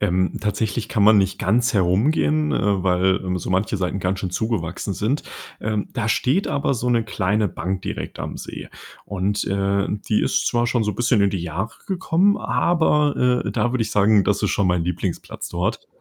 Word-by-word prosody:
Ähm, 95 -2 0
tatsächlich 105 +1 -2
kann 100 -2 +2
man 105 -1 +7
nicht 95 - 0
ganz 115 +6 +2
herumgehen, 140 - +2
äh, 100 -2 +1
weil, 95 +1 +2
ähm, 90 0 -1
so - - -7
manche 95 +3 0
Seiten 95 +1 -2
ganz 95 +1 -1
schön 95 - -3
zugewachsen 100 -3 -2
sind. 115 +10 -1 0.4
Ähm, 105 -1 -2
da 115 -3 -2
steht 140 - +1
aber 140 -1 0
so 125 0 -1
'ne 115 -2 +2
kleine 105 +1 0
Bank 95 +2 -4
direkt - - -5
am - - -5
See - - -8 0.4
und, 100 +1 -1
äh, 100 0 0 0.2
die 105 - +3
ist - - +1
zwar 120 0 +1
schon 120 -1 +1
so 105 - -1
bisschen 120 -1 +2
in 100 0 +3
die 95 -4 -3
Jahre 90 +7 -4
gekommen, 190 +1 +2
aber, 150 -7 +2
äh, 100 - 0
da 120 - 0
würde 125 -3 +1
ich 110 - -4
sagen, 105 0 +4
das - - 0
ist - - +1
schon 100 - +1
mein 90 -2 +1
Lieblingsplatz 90 0 -4
dort. 95 +7 -2
105 Hz, 195 wpm, -22 LUFS, 95-120 Hz, 0.4 s, man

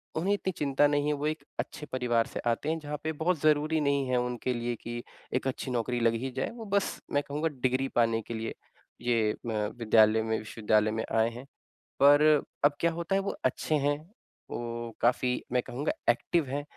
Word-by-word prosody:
उन्हें 185 +6 +1
इतनी 195 -2 -1
चिंता 145 0 +3
नहीं 145 0 +1
है। 150 - +2
वो 145 +1 -2
एक 155 -2 -3 0.2
अच्छे 150 - -4
परिवार 120 -3 +1
से - - -6
आते 120 +5 0
हैं, 160 +1 0
जहाँ 150 -1 -5
पे 160 - -1
बहुत 160 +2 0
ज़रूरी 155 +1 +3
नहीं 140 -2 +1
है 125 - +2
उनके 125 +1 -1
लिए 120 0 -2
कि 120 0 -5 0.3
एक 130 - 0
अच्छी 130 0 -3
नौकरी 120 0 -1
लग 115 -1 +3
ही 130 - -2
जाए, - - 0
वो 230 -2 -8
बस 200 0 0
मैं 145 0 +2
कहूँगा 150 +3 -1
डिग्री 130 +1 +1
पाने 115 -1 +3
के 115 - -7
लिए 115 0 -3 0.5
ये 115 -3 +2
अ, 110 -3 -2
विद्यालय 110 -1 +5
में, 110 0 0
विश्वविद्यालय 110 0 +1
में 110 +1 -2
आए 110 0 +3
हैं। 125 +3 -9 0.5
पर 145 +1 +7 0.4
अब 145 - +6
क्या 170 - +3
होता 170 +3 -2
है 195 - +3
वो 200 - -3
अच्छे 130 +4 +1
हैं, 145 0 +1 0.5
वो 120 0 -4
काफ़ी 125 +1 +2
मैं 125 0 +2
कहूँगा 140 +5 -2 0.2
एक्टिव 155 +7 +2
हैं, 145 +2 -2
130 Hz, 205 wpm, -29 LUFS, 115-150 Hz, 0.5 s, पर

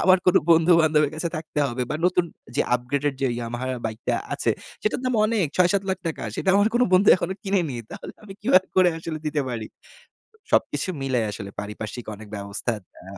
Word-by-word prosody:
আমার 185 0 +6
কোনো 180 - +6
বন্ধুবান্ধবের 160 -3 +5
কাছে 170 +2 -2
থাকতে 155 -1 -5
হবে 125 +1 -2
বা - - -1
নতুন 180 -1 +3 0.3
যে - - +4
আপগ্রেডেড 140 +3 -1
যে - - +3
Yamaha 120 +2 -4 0.2
বাইকটা 110 0 -2 0.2
আছে, - - 0 0.3
সেটার 215 - 0
দাম 255 -1 0
অনেক! 215 -7 +1
৬-৭ 185 +2 +3
লাখ 190 - -1
টাকা। 160 - -3
সেটা 190 - -3
আমার 205 +2 +4
কোনো 250 +1 +4
বন্ধু 190 +3 +5
এখনো 190 - -3
কিনেনি। 180 - 0
তাহলে - - -8
আমি 200 -2 -10
কিভাবে 190 -2 +4
করে 185 -1 +6
আসলে 160 -1 -5
দিতে 150 -1 0
পারি? 110 -3 -4 0.8
সবকিছু - - +1
মিলে 130 -3 +1
আসলে, 100 -1 -7
পারিপার্শ্বিক 105 +3 -6
অনেক 105 +1 -12
ব্যবস্থা, 100 +4 -3 0.3
আ - - -15
155 Hz, 180 wpm, -24 LUFS, 120-185 Hz, 0.8 s, আমার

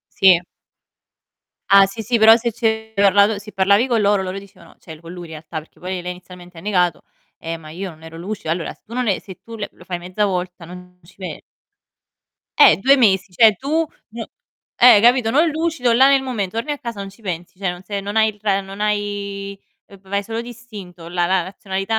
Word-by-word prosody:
Sì. 185 -3 +6 1.3
Ah 195 0 +8
sì, 210 +3 -7
sì, 235 +2 0
però 220 +1 +8
se 235 0 -2
ci 230 0 -2
avevi 220 0 -1
parlato 200 +1 +4
se 210 +1 -12
parlavi 200 +5 +3
co' 240 -3 0
loro, 205 -2 +2
loro 190 +1 -5
dicevano, 200 -1 -16
cioè 160 - -11
l - - -20
co' 165 - -13
lui 175 0 -8
in 160 - -14
realtà, 155 +1 -7
perché 155 - -14
poi 180 0 -4
lei 180 - -5
inizialmente 180 -1 -12
ha - - -8
negato: 180 -3 0 0.3
"Eh 165 0 -5
ma 155 -1 -12
io 190 +4 -6
non 160 -1 -16
ero 160 0 -10
lucido". 195 -1 -5
Allora 165 0 -2
se - - -35
tu 230 - -16
non 250 -1 -1
e 195 - +1
se 190 -3 -12
tu 230 0 -10
le 205 - -5
lo - - -17
fai 175 -2 -4
mezza 185 +4 -1
volta 180 -2 -4
non 180 0 -12
ci 175 +3 -20
pe 180 -5 -7 1.2
Eh! 155 - +8
2 270 +5 +5
mesi, 195 -6 +2
cioè 215 +1 +5
tu, 310 - 0 0.3
n 230 0 -6 0.5
eh, 240 -4 +7
capito, 240 0 +4
non 310 +6 +3
lucido 315 -6 0
là 265 +3 +6
nel 275 -1 +4
momen 230 -8 -3
torni 230 +9 -4
a 290 - -2
casa 230 -5 -6
non 195 0 -6
ci 200 +4 -21
pensi, 180 -2 -6
cioè 190 -2 -1
non 180 0 -9
se 200 +1 -4
non 205 +2 -6
hai 220 0 +4
il 210 -1 -7
ra 200 -2 +1
non 195 +1 -10
hai 200 -1 -3 0.3
v 200 - -16
vai 200 +1 -1
solo 225 +2 -4
d'istinto, 210 -8 -10
la 175 0 0
la 185 0 +2
razionalità 195 +3 -3
200 Hz, 225 wpm, -20 LUFS, 180-225 Hz, 1.3 s, Ah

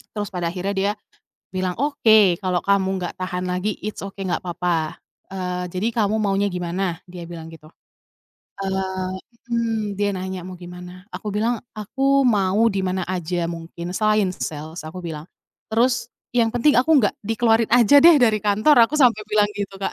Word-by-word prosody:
Terus 205 -1 -3
pada 175 -3 -2
akhirnya 180 +3 -3
dia 200 +1 0 0.6
bilang, 185 -1 -2
"Oke, 220 - +4
kalau 185 -2 0
kamu 200 -1 +2
nggak 180 -2 -4
tahan 180 0 -3
lagi, 180 +3 -2
it's 215 - -5
ok, 195 0 -6
nggak 180 -1 -1
papa, 175 -3 -2 0.3
eee, 180 -1 -4
jadi 195 +6 -2
kamu 215 -1 +1
maunya 200 -1 +1
gimana?" 180 0 -2
Dia 175 -2 -10
bilang 165 -1 -9
gitu. 155 -1 -14 0.9
Eee 190 -1 -2 0.3
mhm. 225 -3 -1
Dia 205 +1 0
nanya, 185 -1 -4
"Mau 185 0 -9
gimana?" 180 +1 -11
Aku 210 - -4
bilang, 225 +3 -1
"Aku 270 +6 +1
mau 205 -1 +3
di 195 -4 0
mana 185 -1 -2
aja 175 -1 -2
mungkin, 170 +1 -6
selain 215 -3 +2
sales," 155 +2 -6
aku 155 +4 -8
bilang, 165 -4 -6 0.5
terus, 235 +1 +1 0.2
"Yang 230 -2 +3
penting 295 +4 +4
aku 255 +6 +3
nggak 210 -6 +2
dikeluarin 225 +1 +2
aja 245 +4 +6
deh 335 -2 +8
dari 220 -5 +3
kantor," 215 +6 +5
aku 305 - -1
sampai 240 -6 +4
bilang 210 -1 +4
gitu 200 -1 -5
Kak. 195 - -2
195 Hz, 170 wpm, -22 LUFS, 180-220 Hz, 0.9 s, deh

